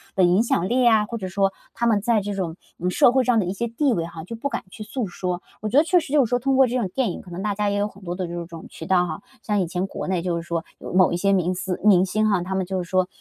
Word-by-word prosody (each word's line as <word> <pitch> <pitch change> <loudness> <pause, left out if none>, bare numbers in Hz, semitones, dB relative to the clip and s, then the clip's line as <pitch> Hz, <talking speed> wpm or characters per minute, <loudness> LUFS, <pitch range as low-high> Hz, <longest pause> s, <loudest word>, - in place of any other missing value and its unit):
的 190 - +3
影 180 +5 +4
响 185 -6 0
力 255 +1 +2
呀， 220 -3 +5
或 230 - -5
者 190 -4 -5
说 195 +1 +1 0.2
他 235 0 0
们 210 -3 +3
在 225 +1 +2
这 205 +1 -4
种， 175 -4 -3 0.2
嗯， 180 - 0
社 240 - +5
会 260 0 +3
上 245 -2 +3
的 200 - 0
一 180 - -2
些 235 +4 -2
地 255 +2 +1
位 165 -4 -1
哈 165 -1 -8
就 230 - -6
不 280 +5 -3
敢 240 - -4
去 215 - -9
诉 225 +1 -3
说。 180 0 -3 0.2
我 215 - -2
觉 255 - +2
得 295 - +7
确 355 +2 +4
实 290 - -8
就 285 -4 +5
是 - - -6
说 245 - +2
通 270 +2 +1
过 265 -1 +6
这 245 +2 -1
种 220 -7 -1
电 250 -8 0
影， - - -7
可 180 - -14
能 175 - -5
大 210 - 0
家 210 0 0
也 200 - -1
有 205 +1 +1
很 195 -1 -15
多 175 -1 -4
的 185 -1 -3
这 170 0 -5
种 165 -1 -10
渠 160 - -9
道 180 -1 +3
哈。 165 +3 -5 0.2
像 210 -2 0
以 180 - -1
前 180 +2 -2
国 - - -6
内 185 -2 0
就 175 0 -1
是 170 - -2
说 170 -1 -3
有 - - -8
某 185 -1 +5
一 - - 0
些 195 +2 +2
明 180 -1 +1
思 185 0 -3
明 190 -3 +6
星 215 +3 +1
哈， 200 -4 +2
他 190 +2 -3
们 190 - 0
就 185 0 -2
是 175 - -13
说 185 -1 +2
195 Hz, 360 characters per minute, -23 LUFS, 180-230 Hz, 0.2 s, 得